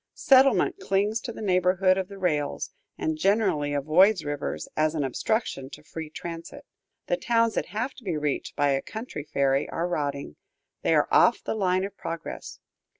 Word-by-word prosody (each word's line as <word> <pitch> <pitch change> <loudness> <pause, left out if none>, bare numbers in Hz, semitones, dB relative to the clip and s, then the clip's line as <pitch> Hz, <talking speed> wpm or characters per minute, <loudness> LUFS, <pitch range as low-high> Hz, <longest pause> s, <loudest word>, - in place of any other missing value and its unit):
Settlement 265 -7 +4
clings 205 +3 0
to 240 - -5
the 220 - -8
neighborhood 185 0 +3
of 190 -1 -2
the 200 0 -10
rails, 150 -6 -1 0.3
and 155 -1 -2
generally 195 -7 +2
avoids 160 +6 +4
rivers 145 -1 -3
as 155 +1 +1
an 150 - 0
obstruction 135 - -2
to 150 - -11
free 160 0 -7
transit. 165 +1 -8 0.4
The - - 0
towns 230 - +2
that - - -2
have 230 +6 -3
to 255 - -15
be 180 -6 -2
reached 150 -2 -2
by 145 -1 +2
a 135 0 +1
country 220 - -7
ferry 135 0 +1
are 170 +1 -2
rotting, 140 - -3 0.4
they - - +2
are - - +3
off - - +4
the - - -2
line 185 -3 +1
of 200 0 -5
progress. 165 -1 -6
180 Hz, 175 wpm, -26 LUFS, 150-205 Hz, 0.4 s, Settlement